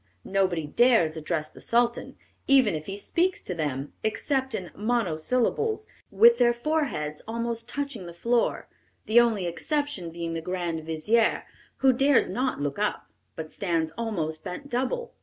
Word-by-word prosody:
Nobody 185 -5 +1
dares 175 -2 +3
address 155 0 -2
the - - -14
Sultan, 235 0 0 0.3
even 265 -7 +5
if 155 -1 -5
he 195 0 -5
speaks 350 - 0
to 180 - -4
them, 145 -4 -3
except 265 +3 0
in 180 -2 -5
monosyllables, 240 - 0 0.2
with 235 +4 +6
their 240 -1 +5
foreheads 240 - -2
almost 230 +1 -3
touching 280 -10 -4
the 170 - -8
floor, 235 +6 0 0.4
the 225 +2 +6
only 225 -6 +2
exception 245 - -2
being 165 0 -5
the 165 - -3
grand 170 -2 -3
vizier, 205 +9 +1 0.4
who 260 - +7
dares 275 +1 +3
not 255 - -1
look 145 +6 -3
up, 210 - -2 0.2
but 155 -1 -7
stands 165 -4 -1
almost 165 -7 -3
bent 200 +10 -7
double. 265 - -2
215 Hz, 150 wpm, -26 LUFS, 165-245 Hz, 0.4 s, who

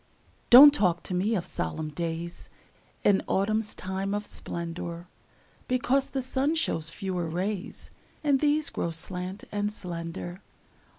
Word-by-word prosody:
Don't 280 +4 +11
talk 180 - +2
to - - -4
me 200 +5 +1
of 180 - -2
solemn 155 - -3
days 170 +2 -5 0.5
In 200 -2 +4
autumn's 215 +2 0
time 190 +2 -3
of 205 0 -3
splendor, 170 -1 -5 0.6
Because 255 +2 +1
the 265 -2 -2
sun 270 +4 0
shows 165 - 0
fewer 180 -1 -3
rays, 185 +4 -4 0.3
And 285 -3 +3
these 300 +1 +1
grow 170 - -2
slant 180 +3 -5
and 205 0 -1
slender. 175 -1 -6
190 Hz, 130 wpm, -28 LUFS, 170-225 Hz, 0.6 s, Don't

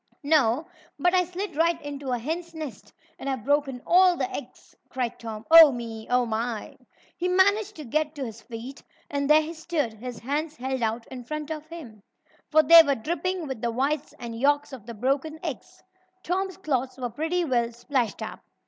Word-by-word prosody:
"No, 285 -2 +3 0.3
but 355 0 +2
I 365 -1 +4
slid 360 +1 -5
right 335 +2 +2
into 285 -2 -6
a 250 - +1
hen's 330 +7 -4
nest, 305 -6 -7 0.3
and 275 - -4
I've 260 -5 -3
broken 280 -2 0
all 360 0 +5
the - - 0
eggs!" - - -10
cried 250 -2 -3
Tom. 225 -1 -7
"Oh, 325 -3 +11
me! 230 -3 -6
Oh, 250 0 +3
my!" 230 0 -3 0.4
He 355 - -2
managed 400 +3 +3
to 310 - -8
get 305 +5 -1
to 275 -2 -4
his 225 -1 -8
feet, 240 +5 -9 0.3
and 280 0 -1
there 305 +1 +6
he 320 +2 -6
stood, 320 -7 -2
his 240 +2 -7
hands 295 +7 -3
held 260 0 -3
out 230 +1 -1
in 255 -1 -7
front 305 +4 -5
of 310 0 -5
him, 280 -11 -10 0.5
for 310 0 +5
they 335 +3 +10
were 285 -3 +1
dripping 345 +7 -2
with 265 -5 -5
the 235 - 0
whites 275 +5 -1
and 230 -1 -7
yolks 290 +2 +2
of 235 -4 -10
the 235 - -7
broken 275 +7 -1
eggs. 360 +4 -7 0.4
Tom's 375 +1 -2
clothes 265 -8 -2
were 245 -2 -4
pretty 325 +7 -1
well 240 -4 +1
splashed 240 0 -2
up. - - -7
285 Hz, 195 wpm, -26 LUFS, 240-325 Hz, 0.5 s, Oh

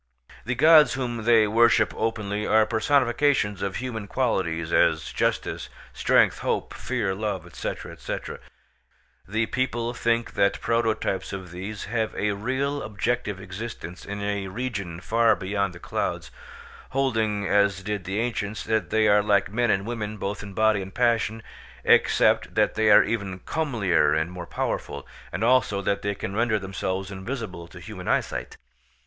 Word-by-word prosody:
The 125 +2 -1
gods 155 +3 +7
whom 120 -4 -3
they 115 -2 +6
worship 115 +3 +4
openly 105 -2 -2
are 110 0 +5
personifications 120 -2 +2
of 100 -1 -2
human 115 -5 -4
qualities, 85 -10 -1
as - - +2
justice, - - -1 0.2
strength, - - +3
hope, - - -2
fear, 115 -7 -2
love, 100 -3 -3
&c., - - -3 0.3
&c. - - -3 1.1
The 110 +4 0
people 120 -1 -2
think 115 -1 0
that 100 0 +2
prototypes 110 -4 -1
of 95 -3 -7
these 95 +4 -6
have 110 0 -2
a 105 0 0
real 130 +7 -2
objective 105 -1 -2
existence 95 -2 -7
in 100 0 -5
a 100 -1 -2
region 100 -6 -4
far 115 +3 +3
beyond 100 0 -2
the - - -10
clouds, - - -3 0.6
holding, 110 -6 0
as 100 -1 +2
did 105 -1 -3
the 95 +3 -2
ancients, 110 -3 -3
that 110 -5 0
they 110 0 +3
are 105 0 +5
like 100 -2 +2
men 120 +2 +1
and 100 -1 +1
women 110 -2 -4
both 100 0 -4
in 100 -1 -9
body 110 -1 +3
and 95 0 -9
passion, 115 -2 +1 0.4
except - - +3
that - - +3
they 110 0 +2
are 105 - +8
even 100 -5 -3
comelier 115 - +1
and 80 +3 -2
more 90 -1 -7
powerful, - - -3 0.2
and 95 +6 -3
also 115 -5 +3
that 100 +1 -1
they 100 0 -2
can 95 0 -5
render 115 -1 +2
themselves 95 0 -3
invisible 95 -4 -6
to 85 - -12
human 90 0 -9
eyesight. - - -1
105 Hz, 155 wpm, -25 LUFS, 95-115 Hz, 1.1 s, are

